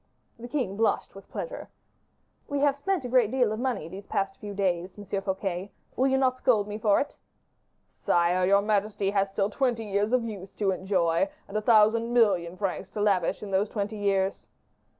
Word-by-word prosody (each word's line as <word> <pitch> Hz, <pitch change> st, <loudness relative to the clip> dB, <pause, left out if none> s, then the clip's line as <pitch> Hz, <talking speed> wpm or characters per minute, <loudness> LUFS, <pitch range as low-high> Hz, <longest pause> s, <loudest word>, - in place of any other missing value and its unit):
The 240 Hz, -, -7 dB
king 240 Hz, -8 st, -2 dB
blushed 225 Hz, 0 st, 0 dB
with 195 Hz, -, -13 dB
pleasure. -, -, -6 dB, 0.8 s
"We 285 Hz, -, -2 dB
have 285 Hz, -1 st, +3 dB
spent 345 Hz, 0 st, -1 dB
a -, -, -2 dB
great 245 Hz, -3 st, +3 dB
deal 250 Hz, -3 st, +2 dB
of 215 Hz, -, -3 dB
money 245 Hz, -11 st, -2 dB
these 190 Hz, +4 st, -9 dB
few 195 Hz, +1 st, -3 dB
days 180 Hz, -3 st, 0 dB
past, -, -, -30 dB
Monsieur 200 Hz, -1 st, -4 dB
Fouquet; 190 Hz, -1 st, -3 dB, 0.3 s
will 260 Hz, -, +2 dB
you 265 Hz, 0 st, +2 dB
not 255 Hz, -1 st, +1 dB
scold 215 Hz, -6 st, +2 dB
me 210 Hz, +1 st, -5 dB
for 210 Hz, -2 st, +3 dB
it?" 285 Hz, -, -3 dB, 0.8 s
"Sire, 175 Hz, +1 st, +2 dB
your 200 Hz, +1 st, +4 dB
majesty 205 Hz, -1 st, 0 dB
has 195 Hz, -1 st, +1 dB
still 195 Hz, +1 st, -1 dB
twenty 240 Hz, -2 st, 0 dB
years 205 Hz, +1 st, 0 dB
of 250 Hz, -1 st, +2 dB
youth 200 Hz, -4 st, -7 dB
to 200 Hz, -2 st, +1 dB
enjoy, 185 Hz, -, +1 dB, 0.2 s
and 200 Hz, -, -11 dB
a 215 Hz, -, +1 dB
thousand 225 Hz, +1 st, +4 dB
million 185 Hz, -7 st, +2 dB
francs 195 Hz, -1 st, -3 dB
to -, -, -4 dB
lavish 200 Hz, -4 st, +1 dB
in 200 Hz, -, -6 dB
those 195 Hz, +2 st, +1 dB
twenty 210 Hz, 0 st, -3 dB
years." 195 Hz, -1 st, 0 dB
205 Hz, 190 wpm, -27 LUFS, 195-230 Hz, 0.8 s, your